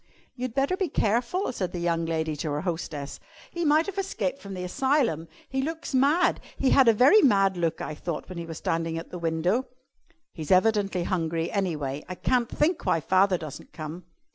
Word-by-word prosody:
"You'd 250 -2 -4
better 275 +6 +2
be 375 -3 -1
careful," 240 - 0
said 185 -7 -3
the 175 - -3
young 170 -1 0
lady 160 -1 -1
to 155 - -3
her 145 +1 -2
hostess; 160 -5 -4 0.3
"he 345 - -3
might 310 +1 +4
have 395 -1 -4
escaped 280 -8 -2
from 200 -1 -7
the 180 - -5
asylum. 245 - +1 0.2
He 265 0 -1
looks 320 +1 -4
mad. 290 +7 +3 0.2
He 270 - +2
had 270 -3 +6
a - - +9
very 265 - +6
mad 195 - +4
look, 170 -2 -1
I 155 - -4
thought, 165 +2 -5
when 185 -2 -7
he 170 - -6
was 165 -2 -6
standing 165 0 -1
at 165 - -7
the 180 - -6
window." 170 +9 0 0.7
"He's 155 -3 -7
evidently 195 -1 +3
hungry, 165 -2 -1
anyway. 150 -8 -2
I 185 - -4
can't 245 +4 +1
think 320 +3 0
why 165 - +2
father 185 +3 +3
doesn't 155 -4 -9
come." 160 +2 -7
185 Hz, 195 wpm, -26 LUFS, 165-265 Hz, 0.7 s, a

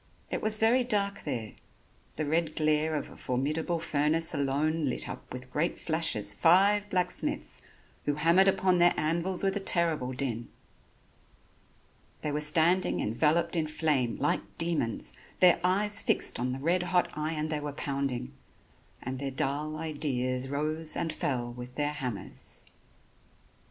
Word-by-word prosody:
It - - -1
was 215 0 +4
very 230 +4 +3
dark 200 -4 -1
there, 120 -7 -3 0.6
the 155 - -2
red 160 +1 0
glare 155 0 +1
of 145 - -4
a - - -12
formidable 150 +7 -1
furnace 160 0 +1
alone 150 +2 0
lit 130 - -1
up - - -9
with 125 0 -8
great 165 +4 0
flashes 155 -11 +1
five 200 - +4
blacksmiths, 180 -2 -1 0.4
who 145 - +1
hammered 170 +5 +4
upon 185 -2 +3
their 175 0 +5
anvils 170 +5 +1
with 195 0 +1
a - - 0
terrible 165 -9 0
din. 125 -3 -3 1.7
They 150 - -1
were 150 +1 -1
standing 165 +5 +3
enveloped 160 +10 +1
in 160 -2 0
flame, 150 -6 0
like 145 - +1 0.2
demons, 165 -9 0 0.3
their 180 -2 +6
eyes 205 +4 +3
fixed - - +2
on 125 +1 -1
the 130 - -3
red 170 +6 +1
hot 180 0 +1
iron 155 0 -2
they 155 -1 -1
were 145 0 -4
pounding; 135 -2 -3 0.7
and 130 +1 -4
their 140 0 -2
dull 145 +3 -2
ideas 135 -5 -2
rose 155 +3 -1
and 160 -2 -2
fell 120 -5 -2
with 125 +1 -9
their 145 +1 -1
hammers. 125 -8 -5
155 Hz, 145 wpm, -29 LUFS, 135-170 Hz, 1.7 s, their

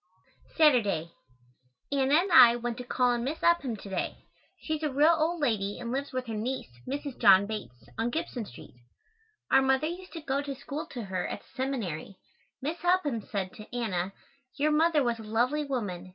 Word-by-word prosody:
Saturday. 205 - +3 0.8
Anna 275 0 +3
and 380 +1 -4
I 240 -8 +9
went 240 -1 -3
to - - -4
call 250 0 +1
on 240 -1 -1
Miss 290 +5 -4
Upham 315 -9 +3
to 200 - -10
day. 190 -2 -4 0.3
She 310 - -2
is - - -15
a 305 - +1
real 295 +5 +5
old 330 +2 0
lady 205 -7 0
and 235 -1 -5
lives 275 +2 -3
with 255 0 -3
her 225 - -5
niece, 230 - -3 0.2
Mrs. 280 0 -4
John 195 0 +7
Bates, 200 - -7
on 230 +1 +1
Gibson 265 -5 -3
Street. 120 - -13 0.8
Our 270 - +6
mother 265 +2 +2
used 360 +3 -6
to 330 - -6
go 275 -1 -1
to 280 -1 -5
school 285 +3 -6
to 245 -3 -6
her 185 -2 -3
at - - -5
the - - -25
Seminary. 230 - -3 0.5
Miss 315 +5 -2
Upham 345 -10 +2
said 195 -2 -4
to 215 +3 -11
Anna, 195 -6 -1 0.5
"Your 300 +1 +2
mother 310 -1 +3
was 235 -2 -1
a - - -8
lovely 245 +8 0
woman. 200 -10 -4
255 Hz, 195 wpm, -29 LUFS, 215-295 Hz, 0.8 s, I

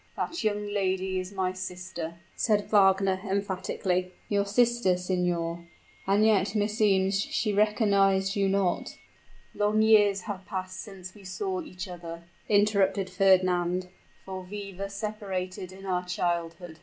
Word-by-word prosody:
"That 335 - -3
young 210 -1 0
lady 190 -2 -1
is 185 +1 -6
my 190 -2 -1
sister," 180 -3 -6 0.2
said 210 -3 +1
Wagner, 195 -2 +4
emphatically. 190 -2 -1
"Your 200 -1 +1
sister, 235 -3 +3
signor! 175 -2 -1 0.4
And 200 +2 +4
yet, 205 -2 +3
meseems, 205 -2 +2
she 210 +1 -1
recognized 200 -2 +3
you 200 -1 +2
not 195 -2 0 0.3
" - - -29
"Long 210 +1 +2
years 205 -3 +5
have 195 -1 -6
passed 185 0 -5
since 185 -3 -9
we 205 - -15
saw 370 - -3
each 190 - -7
other," 170 -2 -8 0.3
interrupted 200 -2 +2
Fernand; 185 -1 +3 0.4
"for 190 -1 -5
we 200 +1 -7
were 195 +2 -4
separated 195 -3 -4
in 195 +1 -11
our 180 -1 0
childhood." 175 -1 -3
190 Hz, 135 wpm, -28 LUFS, 185-205 Hz, 0.4 s, years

